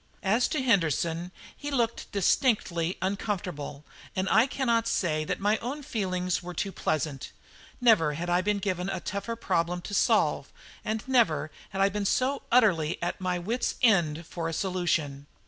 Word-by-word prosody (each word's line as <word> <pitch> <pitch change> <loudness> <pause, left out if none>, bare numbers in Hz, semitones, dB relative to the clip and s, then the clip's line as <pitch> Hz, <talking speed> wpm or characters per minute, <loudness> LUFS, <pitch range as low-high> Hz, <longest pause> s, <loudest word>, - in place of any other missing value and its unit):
As 220 +5 +3
to 295 -4 -1
Henderson, 170 - +1 0.2
he 290 - -6
looked 235 -5 -1
distinctly 190 - +1
uncomfortable, 180 -7 -3 0.3
and 190 0 0
I 225 +4 +5
cannot 235 -4 +1
say 155 -8 0
that - - -2
my 210 +2 +2
own 280 +5 -5
feelings 185 - -1
were 180 0 -7
too 195 +4 -2
pleasant. 150 -6 -2 0.5
Never 215 - +4
had 170 +4 -4
I 175 +1 +2
been 205 +2 +1
given 185 -2 -2
a - - -2
tougher 205 +4 -4
problem 175 -5 0
to 205 - -7
solve, - - +2 0.3
and 220 +2 -3
never 160 - +2 0.2
had 195 - -3
I 195 - +5
been 205 +1 -3
so 265 +7 +1
utterly 185 -10 +3
at 175 +2 -3
my 180 -1 0
wits' 220 +8 -2
end 170 -8 +3
for 165 0 -4
a - - -4
solution. 160 -7 -1
190 Hz, 165 wpm, -28 LUFS, 170-225 Hz, 0.5 s, I